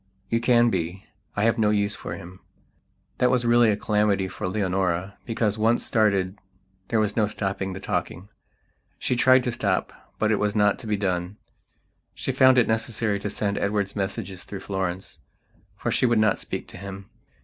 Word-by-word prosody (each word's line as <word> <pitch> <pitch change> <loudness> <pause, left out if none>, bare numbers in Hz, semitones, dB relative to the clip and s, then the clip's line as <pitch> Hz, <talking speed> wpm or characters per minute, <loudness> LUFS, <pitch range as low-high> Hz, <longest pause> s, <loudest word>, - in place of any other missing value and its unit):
You 115 - +2
can 120 -1 +4
be. 90 +1 -3 0.3
I 105 - 0
have 115 +1 +2
no 105 -1 +3
use 105 -1 +1
for - - -6
him." 90 +2 -11 0.8
That 125 - +4
was 125 -1 +1
really 120 -1 +5
a 105 - +1
calamity 105 -2 +1
for 95 - -5
Leonora, 95 -1 -1
because, 110 -2 0
once 115 +2 +2
started, 100 -3 +1 0.5
there 115 - +1
was 105 -1 0
no 110 -3 +2
stopping 95 -2 -3
the 95 - -6
talking. 95 0 -3 0.7
She 125 - -1
tried 130 +1 +5
to 125 - -1
stopbut 110 +1 -2
it 105 - +2
was 105 0 0
not 105 -1 +3
to 115 - -9
be 105 -1 0
done. 90 0 -2 0.8
She - - -2
found 130 0 +5
it 125 - +5
necessary 110 -2 0
to 105 - -3
send 100 0 -1
Edward 100 -1 -1
messages 95 -2 -3
through 100 - -8
Florence; 95 -1 -4 0.6
for - - -2
she 130 - +2
would 120 -1 +2
not 110 -2 +3
speak - - -5
to - - -10
him. 100 0 -9
105 Hz, 180 wpm, -25 LUFS, 95-110 Hz, 0.8 s, really